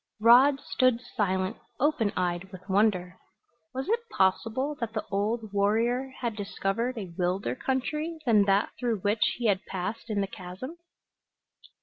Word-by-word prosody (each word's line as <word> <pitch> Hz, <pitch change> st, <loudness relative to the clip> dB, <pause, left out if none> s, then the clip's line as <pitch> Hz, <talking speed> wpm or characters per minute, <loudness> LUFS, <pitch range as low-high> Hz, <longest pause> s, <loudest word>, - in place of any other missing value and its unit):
Rod 255 Hz, +5 st, +7 dB
stood 255 Hz, -3 st, +2 dB
silent, 190 Hz, -3 st, -1 dB, 0.2 s
open 280 Hz, -6 st, +2 dB
eyed 180 Hz, +1 st, -1 dB
with 185 Hz, -1 st, -11 dB
wonder. 190 Hz, -3 st, +1 dB, 0.5 s
Was 265 Hz, +1 st, -4 dB
it 465 Hz, +1 st, -1 dB
possible 225 Hz, -, +1 dB
that 230 Hz, -2 st, -3 dB
the 215 Hz, -, -3 dB
old 210 Hz, +2 st, -1 dB
warrior 230 Hz, +6 st, +1 dB
had 235 Hz, -3 st, -1 dB
discovered 210 Hz, +4 st, -2 dB
a 190 Hz, -6 st, -6 dB
wilder 180 Hz, +2 st, 0 dB
country 300 Hz, +6 st, -2 dB
than 215 Hz, -5 st, +5 dB
that 200 Hz, +1 st, +2 dB
through 235 Hz, -5 st, -1 dB
which 210 Hz, +2 st, 0 dB, 0.2 s
he 240 Hz, -, -3 dB
had 200 Hz, -3 st, +2 dB
passed 195 Hz, +5 st, -4 dB
in 210 Hz, -2 st, 0 dB
the 200 Hz, -, +1 dB
chasm? 195 Hz, -, -8 dB
220 Hz, 145 wpm, -28 LUFS, 195-255 Hz, 0.5 s, Rod